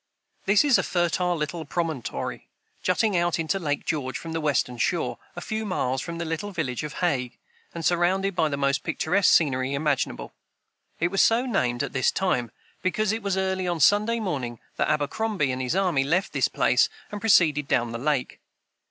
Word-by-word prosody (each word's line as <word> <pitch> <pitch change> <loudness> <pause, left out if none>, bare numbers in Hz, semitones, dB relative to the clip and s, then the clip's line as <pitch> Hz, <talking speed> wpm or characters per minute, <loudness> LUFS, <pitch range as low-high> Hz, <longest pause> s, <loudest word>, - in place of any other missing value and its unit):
This 200 +1 +5
is 280 -4 +4
a - - +3
fertile 175 0 0
little 160 +1 -3
promontory, 155 -5 -4 0.3
jutting 195 +3 +1
out 175 -1 +1
into 165 +4 -1
Lake 145 -5 -2
George 130 -5 -2
from 165 - -7
the 165 0 -2
western 135 -5 0
shore, - - 0 0.2
a - - -6
few 220 0 -3
miles 135 -10 -1
from 170 +2 -6
the 170 - -3
little 165 +5 -3
village 155 - -3
of 150 -1 -5
Hague, 130 -7 -1 0.4
and 165 -1 -4
surrounded 180 +2 +1
by 160 -2 +2
the 140 - -2
most 140 0 +1
picturesque 195 +5 +2
scenery 135 -3 +2
imaginable. 145 -2 -1 0.7
It 170 - +1
was 195 +1 +2
so 235 +3 +3
named, 125 - 0
at 140 - -5
this 130 -2 +2
time, 125 -11 0 0.3
because 210 +3 0
it 225 +1 -2
was 200 -2 -1
early 190 -1 -1
on 175 -2 -1
Sunday 210 +8 +4
morning 130 - -3 0.2
that - - +1
Abercrombie 155 +2 0
and 130 0 -3
his 130 +6 -1
army 180 -8 +2
left 175 +7 0
this - - +2
place - - +2 0.2
and 205 -1 -6
proceeded 155 -9 +4
down 120 -3 +1
the 115 - -4
lake. 140 -1 -1
165 Hz, 185 wpm, -25 LUFS, 140-190 Hz, 0.7 s, This